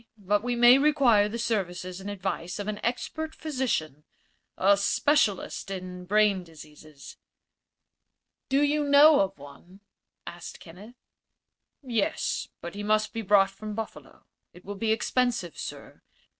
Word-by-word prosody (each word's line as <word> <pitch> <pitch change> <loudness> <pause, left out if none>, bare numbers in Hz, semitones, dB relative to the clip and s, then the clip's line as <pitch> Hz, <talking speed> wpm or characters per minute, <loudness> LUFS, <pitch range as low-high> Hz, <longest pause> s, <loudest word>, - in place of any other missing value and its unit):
But 205 0 0
we 245 +1 -2
may 240 +2 +7
require 265 -8 +4
the 230 - -5
services 185 -5 -3
and 200 - -6
advice 190 -2 -4
of 205 0 -5
an 210 -1 -3
expert 315 +6 -3
physician 245 - -3 0.5
a 200 +2 +4
specialist 205 0 0
in 180 -1 -7
brain 205 -1 +2
diseases." 155 -3 -14 1.3
"Do 275 +2 +3
you 295 +1 +1
know 290 +1 +6
of 195 0 0
one?" 145 +7 -15 0.4
asked 175 0 -9
Kenneth. 195 +8 -13 0.9
"Yes; 235 -6 -1
but 170 - -7
he 205 - -6
must 215 +1 0
be 225 - -3
brought 195 -1 +4
from 210 +2 -8
Buffalo. 225 0 -8 0.3
It 180 - -17
will 205 - -5
be 220 +2 -1
expensive, 230 -5 0
sir. - - -9
205 Hz, 135 wpm, -27 LUFS, 185-240 Hz, 1.3 s, may